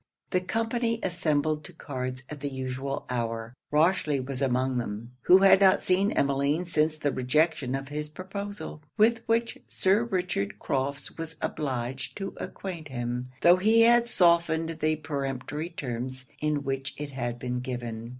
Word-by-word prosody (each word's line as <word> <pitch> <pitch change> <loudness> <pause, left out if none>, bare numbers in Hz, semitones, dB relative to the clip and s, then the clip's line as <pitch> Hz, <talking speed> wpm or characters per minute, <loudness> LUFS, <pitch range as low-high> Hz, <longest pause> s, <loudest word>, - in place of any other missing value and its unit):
The 185 - +2
company 230 +3 -1
assembled 155 -4 0
to 180 - -12
cards 130 -4 -5
at 150 - -8
the 145 +1 -3
usual 130 +1 -4
hour. 115 -1 -3 0.2
Rochely 150 -2 +3
was 130 +1 -4
among 130 -1 +1
them; 115 +1 -5
who 180 - +9
had 195 0 +7
not 190 -1 +5
seen 195 +3 +2
Emmeline 140 +4 +1
since 155 -2 +1
the 145 -2 0
rejection 135 0 +1
of 135 0 -5
his 150 +1 -4
proposal, 195 0 -6 0.2
with 225 +1 +4
which 230 +1 +1
Sir 195 +4 +2
Richard 180 - -1
Crofts 140 +5 -3
was 165 0 -5
obliged 130 -3 -3
to 195 -1 -4
acquaint 170 -5 -6
him, 125 -1 -3
tho' 175 +1 +8
he 220 +4 +5
had 235 +1 +6
softened 170 -4 +3
the 155 0 +2
peremptory 145 +1 -4
terms 130 -4 -5
in 150 -1 0
which 135 0 -3
it 145 -1 -5
had 120 -3 -3
been 125 0 -3
given. 120 -3 -5
150 Hz, 155 wpm, -28 LUFS, 130-180 Hz, 0.2 s, who